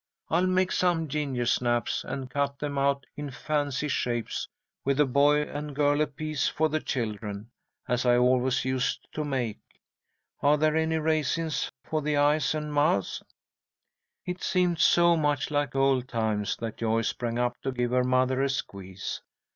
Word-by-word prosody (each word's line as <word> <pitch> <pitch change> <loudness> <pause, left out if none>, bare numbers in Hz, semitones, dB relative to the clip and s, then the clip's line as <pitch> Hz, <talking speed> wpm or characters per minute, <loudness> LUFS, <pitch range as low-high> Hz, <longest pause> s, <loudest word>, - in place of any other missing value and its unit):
I'll 175 +3 +3
make 185 0 +2
some 170 -3 +1
gingersnaps, 125 -5 0
and 135 -2 -5
cut 140 +1 -1
them 145 -1 -3
out 140 0 +1
in 145 -1 -5
fancy 145 +1 -2
shapes, 120 -4 -2 0.4
with 140 +1 0
a 150 - +6
boy 145 +3 +3
and 150 0 -6
girl 145 +1 +2
apiece 155 -1 -1
for 155 0 +1
the 155 +1 0
children, 110 -4 -4 0.4
as 125 0 0
I 120 -1 +4
always 125 +1 +2
used 130 0 -1
to 155 - -2
make. 130 -7 -2 0.8
Are 145 +1 +4
there 155 +1 +2
any 160 0 +1
raisins 160 0 0
for 155 -1 -2
the 150 0 0
eyes 145 0 +3
and 150 -1 -4
mouths?" 145 - +1 1.0
It 180 0 -4
seemed 180 -3 +1
so 170 +1 +5
much 145 -3 0
like 145 -3 0
old 135 -2 +2
times 110 -4 -1
that 115 -1 -5
Joyce 115 0 +1
sprang 120 -1 -3
up 120 0 -1
to 135 - -2
give 125 -1 -1
her 125 0 +3
mother 130 +1 +2
a 140 - +1
squeeze. 95 -7 -5
140 Hz, 160 wpm, -27 LUFS, 125-150 Hz, 1.0 s, a